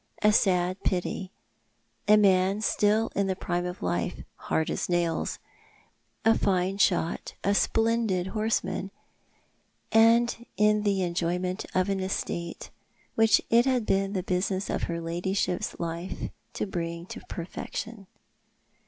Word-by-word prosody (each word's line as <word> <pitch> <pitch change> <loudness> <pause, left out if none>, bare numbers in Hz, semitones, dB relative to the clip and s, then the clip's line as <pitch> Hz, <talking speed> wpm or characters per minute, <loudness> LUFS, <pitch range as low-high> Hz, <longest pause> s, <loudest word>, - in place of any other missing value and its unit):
A 210 0 +5
sad 185 -2 +2
pity 185 +1 -1 0.4
— - - -43
a 210 +1 +7
man 195 0 +3
still 215 +1 +2
in 200 -1 +1
the 190 - 0
prime 175 -1 -2
of 180 - -7
life 90 -1 -2
— - - -43
" - - -45
hard 160 - +1
as - - -2
nails 170 -2 0 0.3
" - - -31
— - - -38
a 225 - +6
fine 190 +1 +1
shot, 175 -4 +1
a 200 - +2
splendid 225 -4 +1
horse 220 0 +1
man, 190 - -4 1.0
and 230 +1 +4
in 210 0 +4
the 200 -2 +1
enjoyment 180 +1 -1
of 185 0 +2
an 195 -1 0
estate 170 -2 -4 0.4
which 225 0 +4
it 235 +3 +5
had 250 -4 +1
been 195 0 +1
the 185 -3 -1
business 185 +1 -1
of - - -1
her 170 0 -2
ladyship's 175 +2 -2
life 170 +2 -4 0.2
to - - -2
bring 170 -3 -4
to - - -8
perfection. 200 +4 -6
190 Hz, 150 wpm, -27 LUFS, 175-210 Hz, 1.0 s, a